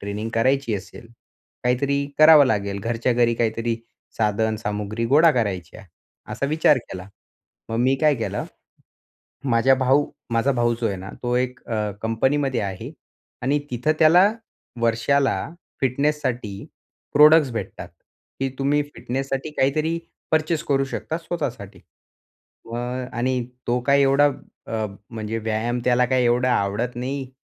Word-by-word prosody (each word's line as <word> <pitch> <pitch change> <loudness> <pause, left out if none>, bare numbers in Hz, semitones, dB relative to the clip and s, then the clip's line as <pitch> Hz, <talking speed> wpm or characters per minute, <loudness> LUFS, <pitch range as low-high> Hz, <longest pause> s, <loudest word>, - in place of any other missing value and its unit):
Training 105 +2 -4
करायची 130 0 +1
असेल. 100 +4 -8 0.6
काहीतरी 140 +3 +1
करावं 155 -2 +8
लागेल 100 -3 -1
घरच्या 115 +3 0
घरी 120 -1 +2
काहीतरी 115 0 -1 0.4
साधन, 110 0 +1
सामुग्री 105 +1 -3
गोळा 155 +6 +6
करायच्या. 100 -3 -3 0.5
असा 140 +6 -2
विचार 150 -2 +3
केला. 95 -4 -9 0.6
मग 115 - -3
मी 130 +2 +3
काय 150 -1 +4
केलं.माझा 115 -4 -5 1.1
भाऊ 135 +2 +2 0.3
माझा 115 +4 +2
भाऊ 120 -2 +1
जो 115 - +1
आहे 100 - -2
ना, 95 +1 -8
तो 120 0 -1
एक 125 0 -2
अ, 105 -2 -1
कंपनीमध्ये 130 +3 0
आहे 95 -2 -5 0.5
आणि 140 +4 +2
तिथं 125 +6 +1
त्याला 175 +6 +6 0.5
वर्षाला 115 +4 +2 0.4
फिटनेससाठी 130 -6 -1 0.5
प्रॉडक्टस 150 -1 +7
भेटतात. 115 - -6 0.5
की 135 - +1
तुम्ही 145 +2 +2
फिटनेससाठी 135 +3 -3
काहीतरी 155 +5 +1 0.3
पर्चेस 160 +1 +1
करू 135 -2 +1
शकता; 150 +3 -4
स्वतःसाठी.अ, 120 - -9 0.4
आणि 125 +1 0 0.2
तो 120 +1 +1
काय 140 0 +4
एवढा 140 +1 +4 0.4
अ, 110 -1 -2 0.2
म्हणजे 110 0 -4
व्यायाम 110 +2 -2
त्याला 125 0 +3
काय 130 0 +2
एवढा 125 +1 +2
आवडत 105 +5 -1
नाही 130 +1 -4
125 Hz, 125 wpm, -23 LUFS, 115-140 Hz, 1.1 s, करावं